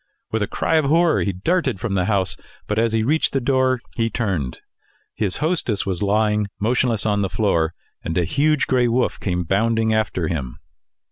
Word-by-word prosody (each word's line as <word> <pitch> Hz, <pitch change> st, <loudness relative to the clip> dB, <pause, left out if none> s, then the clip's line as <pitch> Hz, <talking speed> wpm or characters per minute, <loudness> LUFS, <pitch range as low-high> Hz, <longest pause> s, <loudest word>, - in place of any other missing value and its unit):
With 110 Hz, -, 0 dB
a 105 Hz, -, 0 dB
cry 165 Hz, -, 0 dB
of 155 Hz, -, +2 dB
horror 165 Hz, +3 st, +3 dB
he 100 Hz, -, 0 dB
darted 130 Hz, -, 0 dB
from 105 Hz, 0 st, -3 dB
the 90 Hz, -2 st, +1 dB
house, 100 Hz, -3 st, +1 dB, 0.3 s
but 105 Hz, +1 st, -1 dB
as 115 Hz, 0 st, +2 dB
he 110 Hz, 0 st, +1 dB
reached 155 Hz, +7 st, +1 dB
the 135 Hz, -, +2 dB
door 130 Hz, -1 st, +1 dB
he 115 Hz, -1 st, 0 dB
turned. 95 Hz, -, -2 dB, 0.5 s
His 100 Hz, -4 st, -1 dB
hostess 155 Hz, -, -1 dB
was 95 Hz, -3 st, -3 dB
lying 105 Hz, 0 st, +1 dB
motionless 115 Hz, 0 st, +1 dB
on 105 Hz, -1 st, +1 dB
the 95 Hz, -, 0 dB
floor, 85 Hz, -4 st, 0 dB, 0.3 s
and 80 Hz, -, -3 dB
a 90 Hz, -, +3 dB
huge 150 Hz, -, +2 dB
gray 125 Hz, -2 st, +2 dB
wolf 120 Hz, +2 st, 0 dB
came 90 Hz, -2 st, -1 dB
bounding 110 Hz, +5 st, +1 dB
after 105 Hz, -6 st, 0 dB
him. 70 Hz, -8 st, -4 dB
110 Hz, 190 wpm, -21 LUFS, 95-125 Hz, 0.5 s, horror